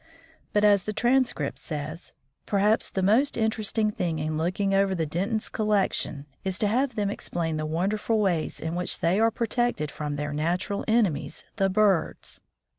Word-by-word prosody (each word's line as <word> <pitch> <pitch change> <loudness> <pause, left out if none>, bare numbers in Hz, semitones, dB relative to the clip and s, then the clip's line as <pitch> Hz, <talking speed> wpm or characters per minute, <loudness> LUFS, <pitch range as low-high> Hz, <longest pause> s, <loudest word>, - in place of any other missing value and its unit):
But, 210 - +2
as 205 -2 +5
the 215 - -2
Transcript 240 - +1
says, 155 +2 -6 0.3
"perhaps 210 +2 +2
the 190 - -2
most 235 +9 +4
interesting 220 -1 +1
thing 170 -5 -2
in 155 0 -2
looking 185 +5 0
over 195 -1 +3
the 165 -2 0
Dentons' 195 +8 -2
collection 200 -8 0 0.2
is 190 -1 -1
to 210 - +1
have 250 +3 +1
them 205 -2 0
explain 165 -5 -3
the 155 0 -2
wonderful 205 +7 0
ways 180 -6 0
in 160 +1 -3
which 180 +1 -1
they 175 +5 +2
are 225 +1 +5
protected 230 - -1
from 150 -1 -4
their 150 +1 -3
natural 175 +6 -1
enemies, 205 -11 +1
the 195 -2 +2
birds. 195 -3 +1
195 Hz, 165 wpm, -26 LUFS, 160-215 Hz, 0.3 s, as